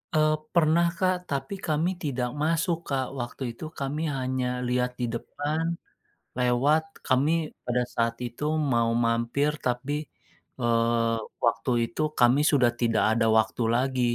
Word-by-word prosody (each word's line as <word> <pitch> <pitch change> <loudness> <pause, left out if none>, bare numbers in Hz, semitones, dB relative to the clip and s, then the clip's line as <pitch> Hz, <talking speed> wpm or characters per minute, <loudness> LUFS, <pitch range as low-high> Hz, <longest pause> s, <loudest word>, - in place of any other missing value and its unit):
Eee, 155 0 +4 0.2
pernah, 170 0 +4
Kak. 185 -1 +2
Tapi 140 +8 -3
kami 155 +2 +1
tidak 130 -4 -1
masuk, 165 +2 +1
Kak. 135 -2 0
Waktu 120 +2 -6
itu 115 - -12 0.2
kami 140 +3 -2 0.2
hanya 130 0 -1 0.2
lihat 125 0 +1
di 125 - 0
depan, 145 +7 -3 0.7
lewat, 130 +6 +3 0.2
kami 135 +4 +3 0.3
pada 125 0 +1
saat 115 0 0
itu 120 +4 -7 0.3
mau 115 -1 +2 0.2
mampir, 115 +6 +1
tapi, 125 +3 -1 0.7
eee, 115 -1 +2 0.3
waktu 115 +2 +1 0.2
itu - - -4 0.2
kami 125 +4 +5
sudah 130 -5 +4
tidak 115 -2 +2
ada 115 - +2
waktu 110 +2 +1
lagi. 130 +1 0
130 Hz, 135 wpm, -27 LUFS, 120-150 Hz, 0.7 s, kami